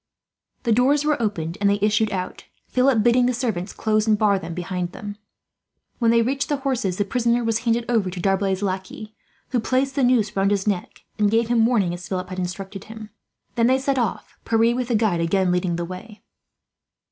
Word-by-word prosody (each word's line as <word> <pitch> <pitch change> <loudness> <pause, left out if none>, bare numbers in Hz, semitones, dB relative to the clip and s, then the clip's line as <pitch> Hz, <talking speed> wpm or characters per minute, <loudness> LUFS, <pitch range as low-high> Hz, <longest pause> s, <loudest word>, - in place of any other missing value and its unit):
The 235 - 0
doors 275 +6 +3
were 300 -4 +1
opened 175 -6 -2
and 200 - +4
they 200 - +2
issued 210 +1 +2
out, 185 -1 -5 0.2
Philip 255 -3 +3
bidding 245 +1 +4
the 250 - 0
servants 215 -6 -2
close 215 0 0
and 215 -1 +4
bar 205 -2 +3
them 165 -1 -7
behind 180 0 -4
them. 205 -1 -7 0.8
When 230 -2 +3
they 230 0 +4
reached 270 +3 -1
the 290 - +1
horses, 255 -9 -1
the 205 - 0
prisoner 240 +2 +1
was 225 0 0
handed 235 -1 0
over 225 -6 +1
to 180 0 -7
D'Arblay's 195 +1 0
lackey, 195 +3 -4 0.4
who 250 - +1
placed 260 +4 0
the 275 - 0
noose 240 -5 +2
round 195 0 +2
his 200 -1 0
neck, 200 -4 -3 0.2
and 210 -1 +3
gave 225 +1 +1
him 230 -2 +4
warning 205 -8 +1
as 175 0 -7
Philip 185 -1 -3
had 185 0 -5
instructed 190 +2 -5
him. 220 -1 -10 0.4
Then 230 -1 +2
they 260 +1 +4
set 270 0 0
off, 235 - -3
Pierre 230 +1 +2
with 250 -1 -2
the 240 - 0
guide 210 -6 +1
again 185 +2 +1
leading 180 -1 0
the 170 0 -3
way. 195 +5 -10
215 Hz, 205 wpm, -23 LUFS, 190-240 Hz, 0.8 s, and